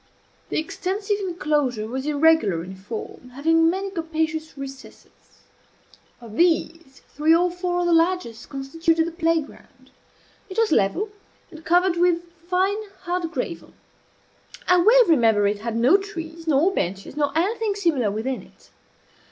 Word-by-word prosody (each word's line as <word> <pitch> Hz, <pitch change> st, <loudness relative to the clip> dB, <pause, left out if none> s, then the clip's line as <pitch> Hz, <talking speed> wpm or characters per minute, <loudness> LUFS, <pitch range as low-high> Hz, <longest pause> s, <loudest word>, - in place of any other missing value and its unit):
The -, -, -2 dB
extensive 395 Hz, +5 st, -2 dB
enclosure 300 Hz, -, -1 dB
was 260 Hz, +4 st, -4 dB
irregular 295 Hz, -, +3 dB
in 190 Hz, +2 st, -9 dB
form, 220 Hz, +5 st, -8 dB
having 325 Hz, +3 st, +3 dB
many 385 Hz, +3 st, -2 dB
capacious 320 Hz, -2 st, -3 dB
recesses. 270 Hz, -1 st, -12 dB, 0.8 s
Of 230 Hz, -3 st, -11 dB
these, 330 Hz, -4 st, 0 dB
three 310 Hz, +3 st, +3 dB
or 355 Hz, +1 st, +2 dB
four 355 Hz, 0 st, -2 dB
of -, -, 0 dB
the 345 Hz, -, +2 dB
largest 330 Hz, -9 st, 0 dB
constituted 325 Hz, +4 st, 0 dB
the 335 Hz, -, -4 dB
play 330 Hz, -1 st, +1 dB
ground. 285 Hz, -, -18 dB, 0.6 s
It 375 Hz, -, -8 dB
was 455 Hz, -1 st, +2 dB
level, 310 Hz, -, +1 dB, 0.4 s
and 320 Hz, -1 st, -12 dB
covered 355 Hz, +1 st, +2 dB
with 345 Hz, -1 st, +2 dB, 0.3 s
fine 385 Hz, +4 st, +1 dB, 0.2 s
hard 355 Hz, -2 st, -2 dB
gravel. -, -, -5 dB, 0.9 s
I 360 Hz, -, +5 dB
well 460 Hz, +7 st, +6 dB
remember 225 Hz, -, +3 dB
it 205 Hz, 0 st, 0 dB
had 225 Hz, +1 st, -4 dB
no 250 Hz, +11 st, +5 dB
trees, 335 Hz, -5 st, -8 dB
nor 315 Hz, +6 st, +3 dB
benches, 195 Hz, -, -3 dB
nor 290 Hz, -1 st, 0 dB
anything 415 Hz, +4 st, 0 dB
similar 320 Hz, -, +1 dB
within 225 Hz, +6 st, -3 dB
it. -, -, -21 dB
325 Hz, 145 wpm, -23 LUFS, 270-360 Hz, 0.9 s, well